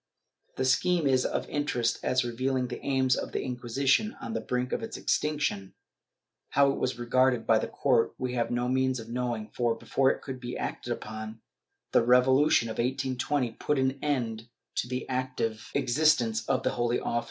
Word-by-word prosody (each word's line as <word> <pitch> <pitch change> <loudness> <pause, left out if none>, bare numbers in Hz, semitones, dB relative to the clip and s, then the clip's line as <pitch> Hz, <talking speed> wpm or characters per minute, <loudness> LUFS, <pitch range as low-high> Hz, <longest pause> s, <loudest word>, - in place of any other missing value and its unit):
The 130 - -1
scheme 170 +6 +2
is 130 -2 +3
of - - -3
interest 125 -5 0
as 130 0 +1
revealing 130 +1 -1
the 120 - -7
aims 130 -2 +2
of - - -5
the - - -1
Inquisition 130 - 0
on 115 - -5
the 115 - -2
brink 125 +3 -2
of - - -1
its 225 0 -5
extinction. 145 -11 -1 0.7
How 140 0 +4
it - - -4
was 130 -1 -1
regarded 125 0 +2
by 110 -1 +4
the - - -2
court 120 -4 +1
we 125 -1 -3
have 120 -2 0
no 120 0 -1
means 130 0 +1
of 115 0 -9
knowing 120 -3 -3
for, 120 -2 0
before 130 +3 +1
it - - -2
could 130 -2 -6
be 120 -1 -5
acted - - -4
upon, 110 +1 -6 0.5
the - - +5
Revolution 125 +2 +4
of 110 - -6
1820 130 +1 0
put 150 - 0
an 130 +1 0
end 120 -6 -2 0.3
to - - 0
the 125 +1 -4
active 130 -4 -2
existence 120 -5 +2
of - - +1
the - - +1
Holy 120 0 0
Office. 120 - -1
125 Hz, 185 wpm, -28 LUFS, 120-130 Hz, 0.7 s, the